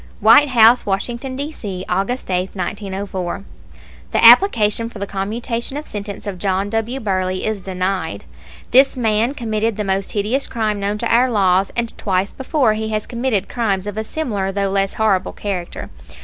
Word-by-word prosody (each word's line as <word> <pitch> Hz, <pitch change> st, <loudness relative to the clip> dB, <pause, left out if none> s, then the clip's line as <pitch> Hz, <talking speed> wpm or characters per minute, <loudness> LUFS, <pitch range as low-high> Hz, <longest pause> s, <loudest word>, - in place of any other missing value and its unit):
WHITE 230 Hz, +8 st, +7 dB
HOUSE, 235 Hz, -1 st, +5 dB
WASHINGTON, 235 Hz, +7 st, -2 dB
D. 285 Hz, +3 st, -4 dB
C., 190 Hz, -10 st, -6 dB
August 200 Hz, +2 st, -2 dB
8, 185 Hz, +2 st, -1 dB
1904. 195 Hz, -1 st, -4 dB, 0.7 s
The -, -, +3 dB
application 230 Hz, -, +6 dB
for 230 Hz, -, -11 dB
the 200 Hz, -, -3 dB
commutation 230 Hz, +7 st, -3 dB
of 300 Hz, -, -6 dB
sentence 205 Hz, -1 st, -7 dB
of 195 Hz, -3 st, -5 dB
John 195 Hz, +1 st, -1 dB
W. 225 Hz, +4 st, -2 dB
Burley 185 Hz, -4 st, -1 dB
is 215 Hz, -2 st, -2 dB
denied. 185 Hz, -, -3 dB, 0.5 s
This 265 Hz, +1 st, +5 dB
man 225 Hz, +2 st, +1 dB
committed 220 Hz, -3 st, -1 dB
the 210 Hz, -, -1 dB
most 195 Hz, 0 st, -2 dB
hideous 220 Hz, +7 st, 0 dB
crime 215 Hz, -3 st, -1 dB
known 200 Hz, +1 st, -1 dB
to 230 Hz, +1 st, -1 dB
our 250 Hz, +2 st, +4 dB
laws, 195 Hz, -4 st, +2 dB
and 235 Hz, -1 st, -2 dB
twice 190 Hz, 0 st, -1 dB
before 265 Hz, -4 st, +1 dB
he 220 Hz, 0 st, -3 dB
has 215 Hz, -1 st, -2 dB
committed 235 Hz, -5 st, -1 dB
crimes 200 Hz, -5 st, -1 dB
of 205 Hz, -1 st, -5 dB
a 220 Hz, -, -2 dB
similar, 215 Hz, -8 st, -2 dB
though 200 Hz, 0 st, -1 dB
less 195 Hz, 0 st, 0 dB
horrible, 205 Hz, -4 st, +1 dB
character. 185 Hz, -4 st, -5 dB
210 Hz, 170 wpm, -19 LUFS, 195-235 Hz, 0.7 s, WHITE